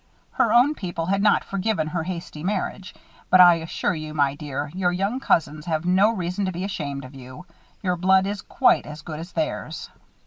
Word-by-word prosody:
Her -, -, +1 dB
own 250 Hz, +5 st, +5 dB
people 175 Hz, -, -4 dB
had 195 Hz, +3 st, 0 dB
not 210 Hz, -, +3 dB
forgiven 195 Hz, -3 st, -1 dB
her 165 Hz, +2 st, -2 dB
hasty 170 Hz, -3 st, -6 dB
marriage; 190 Hz, -1 st, -3 dB, 0.3 s
but 185 Hz, -, +6 dB
I 175 Hz, -1 st, +9 dB
assure 165 Hz, +4 st, -2 dB
you, 155 Hz, -2 st, -6 dB
my 140 Hz, -2 st, +2 dB
dear, 145 Hz, 0 st, -5 dB
your 180 Hz, -1 st, +1 dB
young 195 Hz, +8 st, -1 dB
cousins 155 Hz, -, 0 dB
have 160 Hz, 0 st, -1 dB
no 190 Hz, +4 st, +4 dB
reason 185 Hz, -2 st, -2 dB
to 185 Hz, -, -1 dB
be 180 Hz, +1 st, -5 dB
ashamed 140 Hz, -8 st, -4 dB
of 130 Hz, -, -12 dB
you. 130 Hz, +5 st, -11 dB, 0.4 s
Your 180 Hz, -2 st, +1 dB
blood 190 Hz, +2 st, +4 dB
is 200 Hz, 0 st, -3 dB
quite -, -, +2 dB
as 150 Hz, 0 st, -9 dB
good 155 Hz, -2 st, -6 dB
as 170 Hz, +3 st, -9 dB
theirs." 160 Hz, -1 st, -4 dB
175 Hz, 200 wpm, -23 LUFS, 155-190 Hz, 0.4 s, I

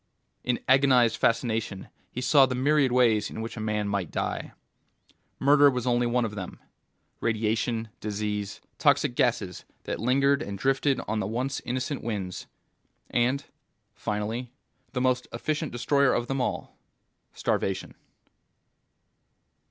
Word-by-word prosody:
In 125 Hz, -1 st, 0 dB
agonized 130 Hz, -3 st, +5 dB
fascination 115 Hz, -4 st, 0 dB, 0.2 s
he 125 Hz, -, -4 dB
saw 135 Hz, +1 st, +6 dB
the 130 Hz, -, -2 dB
myriad 140 Hz, 0 st, +3 dB
ways 115 Hz, -4 st, +3 dB
in -, -, -7 dB
which 115 Hz, +1 st, -5 dB
a -, -, -6 dB
man 105 Hz, -1 st, -1 dB
might 100 Hz, -4 st, -1 dB
die. -, -, -3 dB, 0.9 s
Murder 145 Hz, +1 st, +6 dB
was 125 Hz, -2 st, -2 dB
only 120 Hz, -1 st, +2 dB
one 120 Hz, 0 st, +1 dB
of 110 Hz, -, -4 dB
them. 95 Hz, -4 st, -7 dB, 0.6 s
Radiation, 110 Hz, 0 st, 0 dB
disease, 105 Hz, -1 st, -3 dB, 0.2 s
toxic -, -, +3 dB
gases -, -, 0 dB, 0.2 s
that -, -, -4 dB
lingered 140 Hz, +4 st, +3 dB
and 100 Hz, -8 st, -5 dB
drifted 135 Hz, +4 st, +1 dB
on 110 Hz, +1 st, -1 dB
the 95 Hz, -, -1 dB
once 125 Hz, +5 st, -2 dB
innocent 130 Hz, +3 st, -2 dB
winds, 100 Hz, -5 st, -4 dB, 0.6 s
and 125 Hz, +3 st, +1 dB, 0.5 s
finally 110 Hz, +4 st, -3 dB, 0.4 s
the 125 Hz, -, -1 dB
most 125 Hz, -1 st, +1 dB
efficient 155 Hz, -1 st, -2 dB
destroyer 140 Hz, +2 st, +2 dB
of 120 Hz, -, 0 dB
them 135 Hz, +1 st, -2 dB
all: -, -, -3 dB, 0.6 s
starvation. 95 Hz, -1 st, -1 dB
120 Hz, 130 wpm, -27 LUFS, 105-130 Hz, 0.9 s, saw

